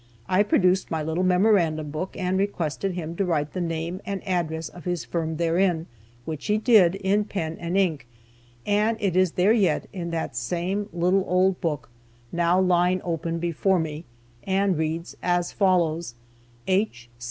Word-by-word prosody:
I 185 +2 +3
produced 185 -2 +2
my 160 -2 -2
little 160 +4 -1
memorandum 180 -5 +2
book, 155 +5 -5
and 185 0 -1
requested 190 -2 -1
him 170 -2 -5
to 200 - +1
write 150 -5 -1
the 185 - -2
name 170 +2 -3
and 200 0 -5
address 165 -3 -1
of 175 - -13
his 175 -3 -2
firm 160 -2 -2
therein, 170 0 +1 0.4
which 155 -3 -5
he 210 - +2
did, 215 -6 +5
in 200 +2 +1
pen 165 -6 -4
and 170 +2 -2
ink, 160 -11 0 0.6
and 210 +2 +2
it 195 -5 0
is 185 -2 +3
there 190 +5 +4
yet, 190 -9 +2
in 175 -3 -4
that 160 -6 -3
same 180 - -2
little 180 +3 +2
old 185 +1 +2
book, 155 -4 -2 0.4
now 175 +1 +2
lying 180 0 +3
open 165 -1 -2
before 175 +3 +1
me, 160 -1 -3 0.4
and 195 0 +1
reads 160 +2 -3
as 175 -1 0
follows: 170 - +1 0.5
"H. 185 - 0
175 Hz, 165 wpm, -25 LUFS, 165-190 Hz, 0.6 s, did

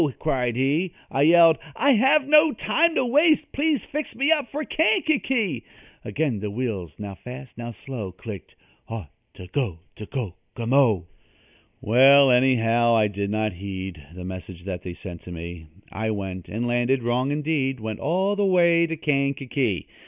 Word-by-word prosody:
cried 125 -6 -1
he. 145 +8 0 0.2
I 135 - 0
yelled: 165 +1 +6 0.2
"I 285 - +3
have 270 +4 +4
no 305 +1 +5
time 320 +10 +1
to 260 - +2
waste 305 +4 +3
Please 290 -3 0
fix 300 +1 -5
me 275 +5 +1
up 295 -5 +2
for 300 +2 -4
Kankakee!" 295 - 0 0.4
Again 140 -8 -2
the 105 +1 -4
wheels, 105 -6 -4
now 105 -2 -6
fast, 125 +7 -10
now 120 0 -6
slow, 115 -3 -7
Clicked: 100 0 -10 0.3
"Ought 110 -10 -7 0.2
to 90 - -10
go 90 - -3 0.2
to 105 - -8
Kokomo!" 115 - 0 0.8
Well, 135 +4 +6
anyhow, 120 -2 +3
I 105 -2 +3
did 100 0 -3
not 110 -1 -1
heed 95 -2 -6
The 90 0 -8
message 90 -1 -8
that 90 -2 -5
they 90 -1 -7
sent 85 -3 -9
to 90 - -11
me. 85 -1 -8 0.2
I 110 0 -3
went, 95 -4 -5
and 115 +3 -3
landed 120 +1 +1
wrong 125 +3 0
indeed 145 -3 -1
Went 110 -1 -5
all 190 +7 0
the 205 - 0
way 170 -3 +4
to 165 0 -4
Kankakee. 140 - -1
125 Hz, 160 wpm, -24 LUFS, 100-170 Hz, 0.8 s, yelled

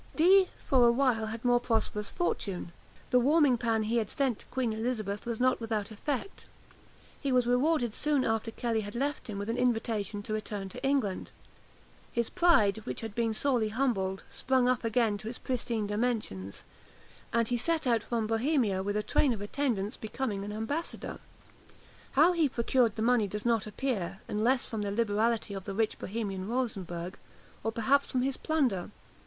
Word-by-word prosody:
Dee, 370 +4 +6
for 250 -3 +4
a - - +6
while, 235 -3 +2
had 225 +2 -6
more 245 0 +5
prosperous 225 -3 -1
fortune. 195 - -2 0.4
The 250 - +6
warming 280 -1 +4
pan 225 -2 +1
he 225 +2 0
had 220 -3 0
sent 270 -6 0
to - - -11
Queen 250 -3 -1
Elizabeth 220 -2 -3
was 235 -2 -2
not 255 -1 +2
without 220 -2 -2
effect. 270 - -4 0.7
He 275 - -1
was 250 -1 +3
rewarded 245 -1 +2
soon 290 -1 +1
after 225 0 0
Kelly 225 -1 -1
had 205 +1 -7
left 285 +4 -2
him 210 -3 -5
with 200 +1 -4
an 230 +2 -1
invitation 225 -4 0
to 215 - -4
return 210 -2 -4
to - - -9
England. 270 -9 0 0.8
His 235 -1 -1
pride, 285 - +4
which 220 - -6
had 225 -2 -5
been 225 0 0
sorely 245 -4 +2
humbled, 210 -6 0
sprang 260 -1 +1
up 250 -1 +1
again 225 -2 +1
to 215 - -8
its 245 - -5
pristine 235 -4 -2
dimensions, 205 - -2 0.7
and 230 -1 +1
he 245 - +1
set 315 +6 0
out 235 -3 +3
from 230 0 -1
Bohemia 225 -3 +1
with 205 +2 -1
a 210 - 0
train 265 +3 +2
of 220 - -5
attendants 210 -3 -1
becoming 220 -2 -3
an 205 - -5
ambassador. 225 +11 -4 0.9
How 310 +6 +6
he 325 -4 +2
procured 235 -2 +2
the 220 - -2
money 235 -3 +3
does 210 +3 -5
not 230 -3 +2
appear, 210 -5 -2
unless 240 +5 +1
from 220 -2 -4
the 205 - -2
liberality 225 0 +1
of 195 -2 -6
the 195 - -4
rich 220 0 0
Bohemian 195 -2 -4
Rosenberg, 185 -8 -3 0.4
or 225 - 0
perhaps 260 +5 +2
from 250 -1 0
his 270 0 0
plunder. 260 - 0
230 Hz, 180 wpm, -30 LUFS, 210-255 Hz, 0.9 s, Dee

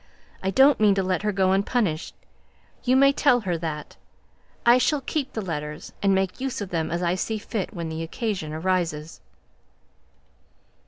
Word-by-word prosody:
I 190 - -1
don't 270 +8 +5
mean 210 -2 +5
to 195 - +1
let 185 0 0
her 210 0 0
go 190 -1 +2
unpunished. 195 -4 0 0.7
You 255 +1 +3
may 275 +1 +6
tell 255 -4 +3
her 180 -4 -1
that. 155 -2 -5 0.7
I 240 +1 +7
shall 275 +4 +1
keep 280 +1 -3
the 220 - -3
letters, 150 -4 -5
and 195 -1 +3
make 190 +3 -1
use 265 -1 -2
of 205 -3 -5
them 160 -2 -1
as 170 +2 -2
I 175 0 +2
see 215 +4 -2
fit 210 -1 -4
when 170 -2 -4
the 160 0 -4
occasion 180 -2 -3
arises." 165 -2 -2
190 Hz, 170 wpm, -25 LUFS, 165-235 Hz, 0.7 s, I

